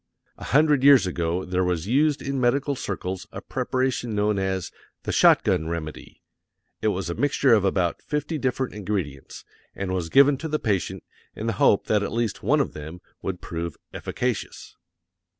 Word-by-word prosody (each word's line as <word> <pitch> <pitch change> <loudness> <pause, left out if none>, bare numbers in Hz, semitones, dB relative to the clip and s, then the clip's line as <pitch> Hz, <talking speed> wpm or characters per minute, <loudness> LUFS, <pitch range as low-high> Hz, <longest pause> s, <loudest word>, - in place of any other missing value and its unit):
A - - -7
hundred 150 -1 +3
years 140 -5 +7
ago 85 0 -2
there 90 0 0
was 90 -2 -1
used 145 +6 +2
in 135 -1 -2
medical 140 +3 +1
circles 95 -3 -4
a - - -6
preparation 130 -3 -2
known 105 -1 +1
as 95 -2 -2 0.3
"the - - -2
shot - - +5
gun 80 - +1
remedy;" 80 -2 -6 0.6
it - - +1
was 95 -3 -1
a 85 - -2
mixture 140 +1 +2
of 105 -4 +4
about 95 -3 0
fifty 150 +1 -3
different 130 0 -1
ingredients, 95 -10 -5 0.3
and 95 -1 -3
was 90 -3 -2
given 140 - +6
to 160 - -5
the 155 0 0
patient 100 -9 -2 0.3
in 110 - -5
the 115 - 0
hope 100 - +4
that 105 -1 +2
at 100 - -3
least 115 -3 -2
one 145 +9 +2
of - - -3
them 80 +4 -8 0.2
would 95 -2 -4
prove 85 -1 -5 0.2
efficacious! - - -4
105 Hz, 175 wpm, -24 LUFS, 90-135 Hz, 0.6 s, years